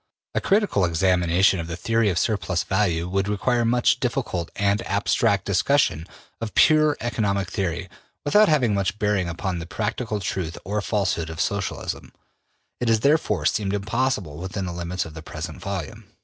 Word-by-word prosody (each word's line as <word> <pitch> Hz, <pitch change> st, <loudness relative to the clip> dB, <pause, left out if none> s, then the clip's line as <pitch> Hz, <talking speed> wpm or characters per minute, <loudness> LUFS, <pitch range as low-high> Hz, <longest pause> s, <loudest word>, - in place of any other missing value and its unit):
A -, -, 0 dB
critical 200 Hz, -, +2 dB
examination 90 Hz, +2 st, +3 dB
of 80 Hz, -, -4 dB
the 85 Hz, -, -4 dB
theory 115 Hz, +3 st, +1 dB
of 90 Hz, -, -1 dB
surplus 90 Hz, -5 st, 0 dB
value 90 Hz, -4 st, 0 dB
would 95 Hz, +2 st, 0 dB
require 120 Hz, +4 st, +1 dB
much 120 Hz, +2 st, +3 dB
difficult 120 Hz, -10 st, -2 dB
and 100 Hz, +1 st, +1 dB
abstract 100 Hz, 0 st, +1 dB
discussion 100 Hz, -, +2 dB, 0.3 s
of 115 Hz, -2 st, -5 dB
pure 155 Hz, -1 st, +5 dB
economic 100 Hz, -5 st, -1 dB
theory 90 Hz, -4 st, -2 dB, 0.4 s
without 210 Hz, +8 st, +5 dB
having 130 Hz, -8 st, +3 dB
much 100 Hz, +1 st, 0 dB
bearing 105 Hz, -4 st, 0 dB
upon 90 Hz, +1 st, -3 dB
the 85 Hz, -, -7 dB
practical 110 Hz, +2 st, -2 dB
truth 90 Hz, -3 st, -3 dB
or 105 Hz, +3 st, -1 dB
falsehood 95 Hz, -6 st, -1 dB
of 80 Hz, 0 st, -7 dB
Socialism; 100 Hz, +2 st, -3 dB, 0.7 s
it 125 Hz, -, -1 dB
has 110 Hz, -1 st, +3 dB
therefore 150 Hz, +5 st, +2 dB
seemed 100 Hz, -1 st, +1 dB
impossible 100 Hz, -, -1 dB
within 95 Hz, +2 st, -4 dB
the 90 Hz, -, -4 dB
limits 85 Hz, +1 st, -3 dB
of 80 Hz, -, -10 dB
the 80 Hz, -, -8 dB
present -, -, -7 dB
volume. 100 Hz, +3 st, -5 dB
100 Hz, 165 wpm, -24 LUFS, 90-115 Hz, 0.7 s, pure